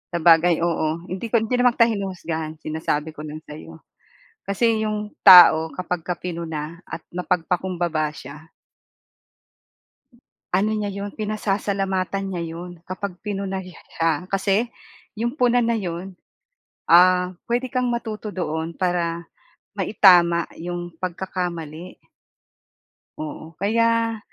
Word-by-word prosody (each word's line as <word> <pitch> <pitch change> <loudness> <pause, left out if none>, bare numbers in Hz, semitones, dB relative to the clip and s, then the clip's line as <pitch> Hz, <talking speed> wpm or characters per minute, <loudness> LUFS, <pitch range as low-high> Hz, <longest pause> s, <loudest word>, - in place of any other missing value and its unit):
Sabagay, 170 0 +4
oo, 165 -1 -1
hindi 190 +5 -5
ko, 230 - -1
hindi 230 +2 +1
naman 245 -1 +4
kita, 230 -1 +4
hinuhusgahan. 170 -6 -4
Sinasabi 155 0 -2
ko 155 0 -9
lang 155 +1 -8
sa'yo. 150 - -11 0.6
Kasi, 220 +2 +1
yung 210 0 -2 0.2
tao 165 -4 +9
'kapagka 180 -1 -3
pinuna, 165 -2 -5
at 160 - -7
mapagpakumbaba 175 -3 -1
siya 145 +3 -12 2.0
ano 195 +4 +2
niya 205 -1 -2
yun, 200 +1 -5
pinasasalamatan 195 -2 -1
niya 180 -3 -3
yun, 175 +1 -7
kapag 185 0 -5
pinuna 195 -2 -3
siya. 165 -2 -3
Kasi, 195 +4 +1 0.5
yung 240 +6 -3
puna 245 -1 +3
na 230 0 +1
yun, 185 0 -5 0.7
ah, 180 +1 +5 0.2
puwede 240 +2 0
kang 250 -1 0
matuto 220 -2 -4
doon. 160 -3 -4
Para, 170 -2 -1 0.5
maitama 175 -4 +5
yung 175 +1 -5
pagkakamali. 175 -2 -5 1.2
Oo 155 +1 -7
kaya, 230 +1 +2
180 Hz, 110 wpm, -22 LUFS, 165-205 Hz, 2.0 s, tao